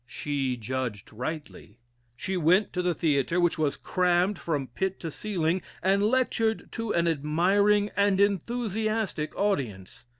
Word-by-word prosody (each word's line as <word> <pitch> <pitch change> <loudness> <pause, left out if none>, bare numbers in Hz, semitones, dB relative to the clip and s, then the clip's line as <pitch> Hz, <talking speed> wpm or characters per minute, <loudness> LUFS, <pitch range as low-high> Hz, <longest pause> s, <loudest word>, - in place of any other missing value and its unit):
She 135 -3 -2
judged 120 -3 -4
rightly. 125 -2 -6 0.4
She 190 - -3
went 180 +4 +3
to 180 - 0
the 180 -1 0
theatre, 155 +1 +1
which 175 -1 +2
was 145 -2 0
crammed 180 +2 +1
from 150 -5 -2
pit 190 0 -2
to 165 - -4
ceiling, 180 -2 -1 0.2
and 195 +1 +3
lectured 225 -1 +1
to 230 -1 -3
an 170 0 +2
admiring 190 +7 +2
and 200 -1 +3
enthusiastic 215 -3 0
audience. 120 - -2
180 Hz, 135 wpm, -27 LUFS, 150-205 Hz, 0.4 s, went